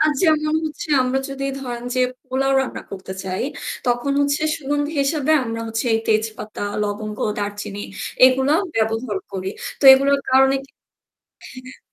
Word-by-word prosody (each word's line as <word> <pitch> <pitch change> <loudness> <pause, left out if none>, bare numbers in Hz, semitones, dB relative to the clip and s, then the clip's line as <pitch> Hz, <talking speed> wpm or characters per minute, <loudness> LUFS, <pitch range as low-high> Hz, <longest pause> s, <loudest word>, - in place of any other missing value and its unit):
আর 310 - +4
যেমন 305 -3 +3
হচ্ছে 310 0 -5
আমরা 255 +1 0
যদি 275 0 -5 0.2
ধরেন 240 -2 -5
যে 255 - +1 0.3
পোলাও 270 +1 0
রান্না 265 - -4
করতে 190 -1 -7
চাই। 185 +2 -2 0.4
তখন 245 +3 +1
হচ্ছে 285 +1 +1
সুগন্ধি 290 +1 -2
হিসাবে 290 +1 +1
আমরা 230 -1 -4
হচ্ছে 225 +3 -2
এই 225 - +3
তেজপাতা, 215 -1 -1 0.2
লবঙ্গ, 210 +1 -4 0.2
দারচিনি 205 0 -4 0.4
এগুলো 265 +2 +2 0.2
ব্যবহার 225 - 0
করি। 190 0 -3 0.3
তো - - -2
এগুলোর 275 +1 +4
কারণে 265 +1 +5
কি 275 - -22 1.0
হ্যাঁ। 255 - -12
255 Hz, 145 wpm, -21 LUFS, 215-275 Hz, 1.0 s, কারণে